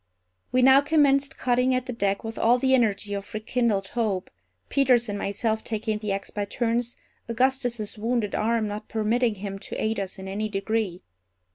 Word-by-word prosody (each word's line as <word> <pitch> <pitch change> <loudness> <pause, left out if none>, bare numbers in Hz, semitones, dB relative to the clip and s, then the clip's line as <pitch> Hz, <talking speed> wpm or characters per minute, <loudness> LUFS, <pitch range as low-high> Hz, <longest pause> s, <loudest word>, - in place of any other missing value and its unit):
We 255 0 +3
now 265 +1 +7
commenced 285 -2 +3
cutting 250 +1 +2
at 255 -1 -1
the 250 - -4
deck 200 -3 -1
with 225 0 -6
all 240 +2 +4
the 265 +1 +2
energy 210 -4 +1
of 200 0 -5
rekindled 215 -3 0
hope, 210 -6 -2 0.4
Peters 250 -4 +3
and 205 - -3
myself 220 +2 -1
taking 220 -1 -2
the 210 -1 -3
axe 195 0 -3
by 205 -1 -2
turns, 235 +2 -1 0.3
Augustus's 240 -3 0
wounded 225 -2 -1
arm 225 0 +1
not 205 +1 -6
permitting 225 +1 +1
him 195 0 -6
to - - -7
aid 220 -1 0
us 195 0 -5
in 190 0 -8
any 210 +3 -2
degree. 195 -2 -2
225 Hz, 175 wpm, -25 LUFS, 205-245 Hz, 0.4 s, now